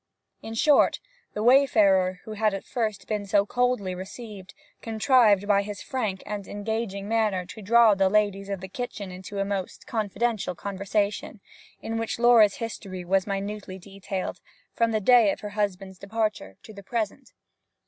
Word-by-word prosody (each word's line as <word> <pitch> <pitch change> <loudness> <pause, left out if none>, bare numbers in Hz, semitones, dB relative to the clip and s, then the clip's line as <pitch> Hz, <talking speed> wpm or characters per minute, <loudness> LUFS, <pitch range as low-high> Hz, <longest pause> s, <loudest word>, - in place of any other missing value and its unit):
In 225 0 -7
short, 290 +5 +4 0.4
the 210 - -2
wayfarer, 205 -8 +4
who 220 - -9
had 215 -1 0
at 195 - -6
first 215 -5 -3
been 210 -2 -3
so 200 0 +3
coldly 245 -5 0
received, 195 +1 -9 0.3
contrived 220 -3 +3
by 200 -1 +4
his 200 -1 -7
frank 215 -8 -3
and 205 -1 -5
engaging 205 -1 -4
manner 215 -5 0
to 220 +4 -10
draw 225 +2 +5
the 195 -1 +2
ladies 200 -1 +1
of 195 -2 -4
the 190 - -6
kitchen 205 -2 -6
into 185 +2 -8
a 195 - 0
most 195 -2 -4
confidential 215 -2 -2
conversation, 200 +3 -2 0.4
in 225 0 -3
which 225 - -3
Laura's 235 -4 +5
history 195 -5 -6
was 190 +2 +1
minutely 200 -1 -4
detailed, 195 0 -6 0.3
from 230 0 +1
the 220 -1 0
day 235 -1 +6
of - - -6
her 210 - -5
husband's 195 -2 -3
departure 205 - -3
to 220 - -12
the 200 - -10
present. 230 +5 -4
205 Hz, 160 wpm, -26 LUFS, 195-225 Hz, 0.4 s, day